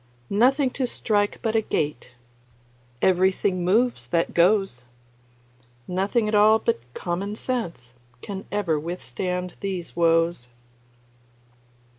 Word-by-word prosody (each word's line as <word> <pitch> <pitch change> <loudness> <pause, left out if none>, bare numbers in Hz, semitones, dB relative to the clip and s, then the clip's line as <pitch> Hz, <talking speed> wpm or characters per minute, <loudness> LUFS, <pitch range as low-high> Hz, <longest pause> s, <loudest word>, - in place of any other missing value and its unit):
Nothing 255 +6 +3
to 260 -1 -2
strike 205 -3 0
but 225 -1 0
a 225 - +4
gait; 145 - -3 0.9
Everything 185 0 +2
moves 210 - +1
that 165 +6 0
goes. 185 - +2 1.0
Nothing 200 +5 0
at 210 - -2
all 215 +1 +6
but 230 +1 -1 0.2
common 190 +4 -3
sense 175 - -4 0.3
Can 195 -1 -6
ever 180 -7 0
withstand 180 +3 -4
these 190 -4 -4
woes. 165 -5 +2
190 Hz, 105 wpm, -24 LUFS, 170-215 Hz, 1.0 s, all